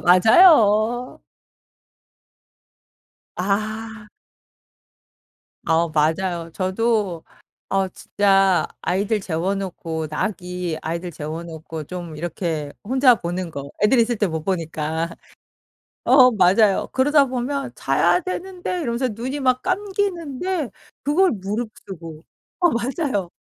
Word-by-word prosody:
맞아요. 220 - +5 2.2
아. 215 +3 -3 1.6
아 165 +1 +2
맞아요. 165 +2 0
저도 195 -2 0 0.5
어 195 -1 +1
진짜 195 -1 +2
아이들 200 +3 0
재워놓고 170 -2 -3
낙이 180 -1 -3
아이들 170 +2 -4
재워놓고 160 +1 -7
좀 175 -2 -7
이렇게 160 -3 -3
혼자 255 +3 +4
보는 175 -3 -4
거, 140 -2 -7
애들 240 +4 +4
있을 235 0 +2
때 205 - +1
못 160 -2 -3
보니까. 165 -2 -2 0.9
어 255 -2 +7
맞아요. 195 0 +3
그러다 285 +2 +4
보면 265 +2 -3
"자야 360 - +2
되는데." 365 0 -4
이러면서 250 -2 -1
눈이 250 +6 -4
막 255 -1 +2
감기는데 370 - -2 0.3
그걸 350 +6 +3
무릅쓰고 195 -6 -6 0.4
어 350 -2 +4
맞아요. 240 - -1
200 Hz, 210 characters per minute, -22 LUFS, 170-255 Hz, 2.2 s, 어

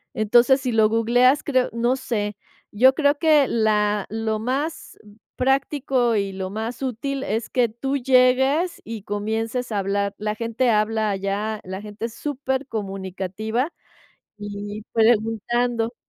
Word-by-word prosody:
Entonces, 240 +5 +4
si 255 -2 -1
lo 220 -1 +4
googleas, 245 +5 +3
creo 255 -3 +1
no 240 +2 +1
sé, 210 -5 -3 0.4
yo 255 +5 +5
creo 290 -1 +2
que 305 -5 +4
la 210 -2 +1
lo 220 0 -2
más 275 +8 -3 0.4
práctico 265 -2 +1
y 200 -2 -1
lo 190 -1 -4
más 220 +5 -5
útil 270 +2 -3
es 220 +3 -2
que 245 -2 +2
tú 270 +5 -3
llegues 265 +6 +3
y 225 -3 -7
comiences 220 +4 -3
a 210 - -1
hablar. 200 +1 -1
La 210 0 -2
gente 230 +2 0
habla 215 0 +1
allá, 200 +2 -2
la 190 +1 -6
gente 210 +1 -6
es 230 -1 -7
supercomunicativa 220 - -3 0.7
y 205 0 -6
preguntando. 230 +1 +1
225 Hz, 135 wpm, -23 LUFS, 210-255 Hz, 0.7 s, yo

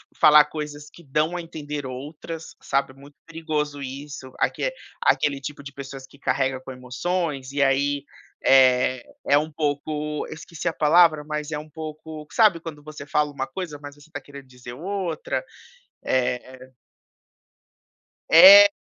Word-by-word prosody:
falar 150 0 +7
coisas 150 -1 -7
que - - -15
dão 155 +5 0
a 175 - -3
entender 150 -4 -6
outras, 150 +5 -8
sabe. 135 -1 -1
Muito 140 +2 -16
perigoso 155 -3 -3
isso, 135 0 -8
aque - - 0 0.3
aquele 140 -1 +2
tipo 140 +1 -7
de 140 0 -9
pessoas 135 -1 -8
que 140 - -20
carrega 130 -2 0
com 130 - -10
emoções 135 +2 -3
e 140 0 +1
aí, 140 +1 +1 0.4
eh, 130 -1 +5 0.2
é 145 - +5
um 155 +1 -4
pouco, 150 0 -2
eu - - -7
esqueci 160 0 -7
a 165 - +1
palavra, 155 0 +4
mas 150 0 -4
é 150 - -2
um 155 +1 -9
pouco, 155 0 -8
sabe 210 -5 +4
quando 155 -3 -9
você 150 -1 -10
fala 150 0 +1
uma 135 -1 -4
coisa 170 -6 -6
mas 145 0 -9
você 145 - -20
está 145 -3 -7
querendo 140 0 -12
dizer 125 -1 -11
outra, 180 - -3 0.6
eh 130 0 -2 1.6
É, 200 +5 +11
150 Hz, 155 wpm, -24 LUFS, 135-155 Hz, 1.6 s, É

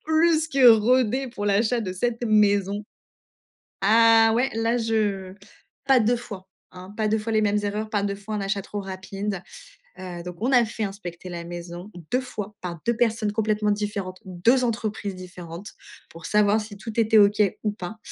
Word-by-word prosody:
plus 320 0 +3
que 270 -4 +6
rodé 250 +3 +3
pour 205 -3 -5
l'achat 220 +4 +2
de 185 -4 -4
cette 235 +5 -2
maison. 205 -2 +2 1.0
Ah 225 +2 +6
ouais 255 +3 +2
là, 230 +1 +1
je 210 -5 -1 0.5
pas 270 -2 +5
2 240 +2 +2
fois 200 -5 -9 0.2
hein? 185 +2 -11
Pas 215 -1 +1
2 220 - +2
fois 225 +2 -4
les 215 - +3
mêmes 210 0 +2
erreurs, 210 +1 -3
pas 205 -2 0
2 200 -1 -1
fois 205 +2 -6
un 210 - -2
achat 195 0 -1
trop 205 +1 -6
rapide, 195 0 -5 0.6
heu, 180 -2 -7
donc 180 -1 -7
on 250 +4 0
a 245 -2 +6
fait 220 0 -4
inspecter 185 -3 -7
la 170 -1 -6
maison 175 +3 -8 0.2
2 250 - +3
fois 210 -5 -7
par 170 -3 -5
2 235 -1 +1
personnes 225 -3 +1
complètement 215 -1 0
différentes, 205 -3 -4
2 225 +8 +2
entreprises 215 -4 -3
différentes 180 +1 -9 0.4
pour 165 +1 -10
savoir 210 +1 +3
si 210 -1 -9
tout 225 +2 -8
était 220 0 +4
OK 205 +1 +4 0.2
ou 210 - +1
pas. 205 +2 -7
210 Hz, 180 wpm, -24 LUFS, 195-225 Hz, 1.0 s, que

